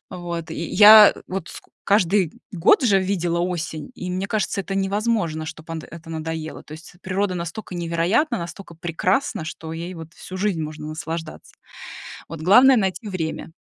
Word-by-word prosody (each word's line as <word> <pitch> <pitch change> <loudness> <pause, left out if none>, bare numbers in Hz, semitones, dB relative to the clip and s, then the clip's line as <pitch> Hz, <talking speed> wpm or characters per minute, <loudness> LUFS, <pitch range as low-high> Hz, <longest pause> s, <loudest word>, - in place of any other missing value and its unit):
Вот, 170 -2 -6
и - - -6
я 210 +5 +8
вот 185 -2 -5
ско - - -12
каждый 195 -3 +2 0.2
год 180 - +4
же 200 -5 +4
видела 175 -3 -1
осень, 165 -4 -3
и 180 - -6
мне 185 +2 -2
кажется, 210 -2 -1
это 195 0 -5
невозможно, 195 -5 0
чтоб 160 0 -9
ант 165 -1 -4
это 165 0 -11
надоело. 160 0 -5
То - - -14
есть, 155 +2 -11
природа 190 0 -1
настолько 175 +3 -6
невероятна, 175 - 0
настолько 170 +1 -8
прекрасна, 175 - -1
что 160 0 -7
ей 170 +3 -6
вот 165 -2 -10
всю 185 - -9
жизнь 190 -4 -1
можно 150 0 -6
наслаждаться. 160 +1 -6 0.8
Вот 165 -1 -8
главное 250 +10 +7
найти 190 0 -1
время. 165 -4 -4
175 Hz, 165 wpm, -22 LUFS, 165-195 Hz, 0.8 s, я